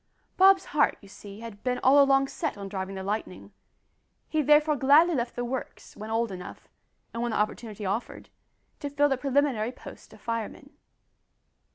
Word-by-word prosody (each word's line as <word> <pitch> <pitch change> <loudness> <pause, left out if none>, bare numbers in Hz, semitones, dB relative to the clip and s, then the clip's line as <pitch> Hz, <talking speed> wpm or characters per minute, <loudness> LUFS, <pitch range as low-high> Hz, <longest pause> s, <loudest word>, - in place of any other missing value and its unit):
Bob's 385 0 +5
heart 295 -1 +3
you 200 - -15
see, 200 +1 -12
had 225 -3 -10
been 250 -1 -1
all 280 +2 +6
along 275 0 +4
set 310 -1 -4
on 200 -1 -6
driving 195 0 -5
the 190 - -5
Lightning; 205 -1 -5 0.8
he 310 - 0
therefore 300 +1 +4
gladly 290 +6 +5
left 245 -4 -2
the 245 - -3
"Works" 255 +1 -6
when 215 +1 -8
old 225 -1 0
enough, 180 -1 -9 0.5
and 230 - -4
when 240 - -1
the 220 - -2
opportunity 215 0 -3
offered, 200 +5 -4 0.5
to 290 - -4
fill 290 +1 +2
the 270 - +2
preliminary 265 -4 0
post - - -13
of - - -15
fireman. 230 +4 -5
245 Hz, 175 wpm, -27 LUFS, 210-285 Hz, 0.8 s, all